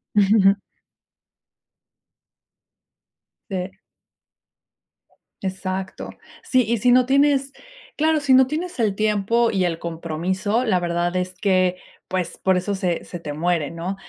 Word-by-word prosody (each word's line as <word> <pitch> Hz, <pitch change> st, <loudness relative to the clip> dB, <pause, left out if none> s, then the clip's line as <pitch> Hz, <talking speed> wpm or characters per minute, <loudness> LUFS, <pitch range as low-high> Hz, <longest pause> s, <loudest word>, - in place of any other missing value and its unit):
Ujú, 205 Hz, 0 st, +4 dB
ujú. 195 Hz, +1 st, +4 dB, 2.9 s
Eh. 190 Hz, +1 st, -4 dB, 1.6 s
Exacto. 190 Hz, 0 st, -4 dB, 0.3 s
Sí, 255 Hz, -3 st, +2 dB
y 235 Hz, 0 st, +1 dB
si 245 Hz, +3 st, +3 dB
no 250 Hz, 0 st, +5 dB
tienes 275 Hz, 0 st, +2 dB, 0.4 s
claro, 315 Hz, 0 st, +2 dB
si 280 Hz, -3 st, +2 dB
no 260 Hz, 0 st, +7 dB
tienes 340 Hz, +4 st, -4 dB
el 210 Hz, -4 st, +1 dB
tiempo 215 Hz, +2 st, +1 dB
y 190 Hz, -3 st, +1 dB
el 165 Hz, -1 st, -2 dB
compromiso, 175 Hz, +7 st, -2 dB
la 185 Hz, -5 st, +2 dB
verdad 175 Hz, +1 st, -1 dB
es 185 Hz, 0 st, -2 dB
que 185 Hz, -1 st, +1 dB, 0.3 s
pues 185 Hz, -2 st, -3 dB
por 190 Hz, -1 st, +2 dB
eso 200 Hz, +2 st, -2 dB
se 180 Hz, -3 st, -2 dB
se 175 Hz, -, -8 dB
te 150 Hz, -3 st, -6 dB
muere, 165 Hz, -1 st, 0 dB
no, 170 Hz, +4 st, -4 dB
190 Hz, 130 wpm, -22 LUFS, 180-235 Hz, 2.9 s, no